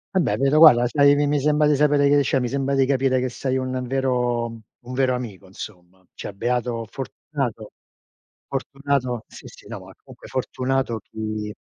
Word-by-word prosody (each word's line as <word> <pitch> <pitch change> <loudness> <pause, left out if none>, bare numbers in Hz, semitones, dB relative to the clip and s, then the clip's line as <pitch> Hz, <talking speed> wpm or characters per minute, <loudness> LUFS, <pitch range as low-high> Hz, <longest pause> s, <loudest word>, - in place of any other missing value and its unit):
Vabbè, 110 - +2
vedo 140 +4 +3
guarda, 125 -7 +8
sai, 140 +2 +5
mi 145 -1 +1
sembra 150 +1 +3
di 150 - +4
sapere 145 0 +3
che 145 0 +4
c'è 135 0 +1
mi 125 - -1
sembra 140 +1 -1
di 135 -1 +3
capire 130 -1 +2
che 130 - -1
sei 130 +1 -2
un 130 -1 -3
vero 125 -2 0
un 115 +2 -11
vero 130 -1 +2
amico 110 -6 -6
insomma. 95 -1 -11
Cioè - - -7
beato 120 +1 -2
fortunato 125 -2 -5 0.8
fortunato 135 -3 -2
sì, - - -13
sì, - - -15
no, - - -7
ma - - -13
comunque - - -15
fortunato 130 -2 -2
chi 110 -1 -4
130 Hz, 170 wpm, -23 LUFS, 120-140 Hz, 0.8 s, guarda